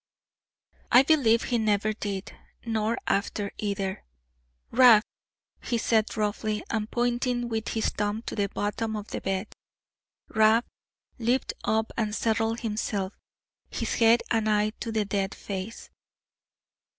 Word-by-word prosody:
I 250 - +8
believe 260 -7 +4
he 240 -2 0
never 215 0 +1
did; 200 -2 -5 0.3
nor 225 0 0
after 200 0 -1
either. 200 -2 -2 0.7
"Rab!" 240 -4 +7 0.6
he 235 - -1
said 220 -1 +1
roughly, 210 0 -1
and 220 -1 -1
pointing 245 0 0
with 225 -1 -2
his 220 - 0
thumb 210 +2 -2
to - - -5
the 200 -2 0
bottom 220 +3 -2
of 210 0 -6
the - - -4
bed. 195 +2 -3 0.7
Rab 220 +2 +4 0.5
leaped 245 +3 0
up, 220 0 0
and 215 -2 -1
settled 225 0 0
himself; 210 -3 -2 0.6
his - - -3
head 230 +1 +4
and 220 -1 +2
eye 210 0 +2
to 230 - -4
the 215 -2 0
dead 195 -1 -2
face. 195 +3 -6
220 Hz, 130 wpm, -27 LUFS, 210-230 Hz, 0.7 s, I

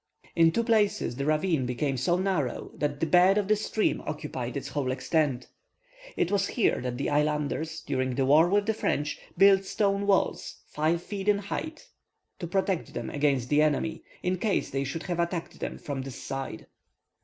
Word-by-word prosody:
In 165 -1 +5
two 230 - 0
places 210 - +1
the 140 +1 -2
ravine 155 -3 +1
became 135 +3 -1
so 150 +8 +1
narrow, 180 -9 -1
that 145 -1 -2
the - - +1
bed 180 +5 +5
of 205 -2 +1
the 215 - +4
stream 215 +1 0
occupied 140 -4 -4
its 140 - -5
whole 140 -4 -1
extent. 130 -1 0 0.7
It 175 - +1
was 200 -1 +2
here 235 - +1
that 125 -1 -3
the 140 - -2
islanders, 150 +1 0
during 130 -1 -2
the 135 - +1
war 155 +5 +5
with 200 +1 +2
the 220 - +1
French, 150 -8 -1 0.2
built 195 0 +6
stone 200 0 0
walls 195 -1 0
five 160 +3 0
feet 200 0 -5
in 205 - +4
height 310 +11 -5 0.5
to 175 - -4
protect 190 0 -1
them - - -4
against 140 -4 +1
the 150 +1 +4
enemy, 155 +1 0 0.2
in 180 0 0
case 210 -1 0
they 135 +1 -1
should 160 +5 -4
have 175 -2 -3
attacked 170 0 -2
them - - -4
from 140 -2 -5
this 130 -2 -8
side. 135 -4 -5
160 Hz, 185 wpm, -28 LUFS, 140-195 Hz, 0.7 s, built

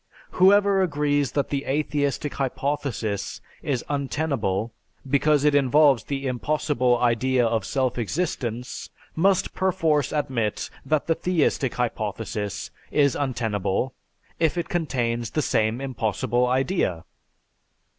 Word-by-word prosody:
Whoever 200 +1 +5
agrees 145 -5 +1
that 140 - 0
the 140 -1 -2
atheistic 145 0 -1
hypothesis 135 -6 -2 0.2
is 130 -5 -2
untenable 135 -8 -1 0.3
because 145 +1 +3
it 150 -1 +4
involves 140 -3 +4
the 140 -1 -3
impossible 130 -1 +1
idea 120 +1 +2
of 115 -2 0
self 130 -3 0
existence, 125 - -3 0.3
must 190 +3 +2
perforce 165 -7 +1
admit 130 -8 -1
that 155 -1 0
the 165 - +2
theistic 160 -7 0
hypothesis 110 -3 -3 0.2
is 140 -2 +3
untenable 115 -3 -1 0.5
if 165 +1 +2
it 170 - -2
contains 120 -9 -1
the 155 - -1
same 110 +2 +1
impossible 120 -1 0
idea.... 130 - 0
135 Hz, 110 wpm, -24 LUFS, 120-150 Hz, 0.5 s, Whoever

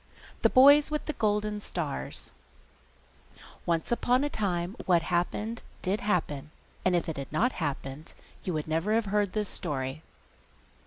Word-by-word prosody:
THE - - +5
BOYS 285 +3 +7
WITH 300 -1 -2
THE 305 - -2
GOLDEN 210 -2 0
STARS 160 -8 -4 1.4
Once 165 +3 0
upon 250 +2 +2
a 290 - +1
time 180 -2 -1
what 175 -3 +4
happened 210 +7 -1 0.2
did 200 +5 0
happen: 160 - -1 0.3
and 185 -1 +3
if 170 - 0
it 160 - -3
had 135 -1 -6
not 230 - +2
happened, 145 - -4 0.3
you 185 - -2
would 155 0 -2
never 165 +7 +1
have 230 -1 +2
heard 205 -1 +1
this 210 -1 0
story. 135 -1 -3
185 Hz, 150 wpm, -29 LUFS, 160-215 Hz, 1.4 s, BOYS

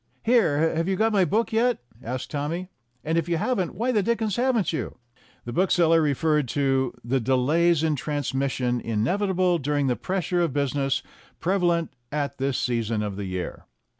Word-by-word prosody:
"Here, 165 -11 +3
have 165 +2 0
you 190 - +1
got 220 +3 +2
my 195 -3 +4
book 220 +4 0
yet 240 +2 +3
?" 110 - -23
asked 125 +2 -5
Tommy; 160 +5 -3 0.3
"and 160 +2 +1
if 165 +1 -4
you 170 - +1
haven't, 195 -3 -1
why 240 +6 0
the 215 -4 +2
dickens 220 -1 0
haven't 240 -7 +1
you?" - - -4 0.5
The 120 - -5
bookseller 170 -1 +3
referred 150 -1 +1
to 135 -1 0
"the 130 +3 +1
delays 150 +7 +2
in 155 -2 +2
trans 145 -1 -3
mission 130 -3 0
inevitable 180 - +1
during 145 0 0
the 125 -2 +1
pressure 180 +1 -1
of 165 -6 0
business 140 -1 0 0.4
prevalent 170 -4 +1 0.2
at 145 -2 -2
this 135 -1 0
season 115 -3 -1
of 105 -2 -3
the 100 0 -4
year." 90 -1 -5
160 Hz, 175 wpm, -25 LUFS, 135-185 Hz, 0.5 s, my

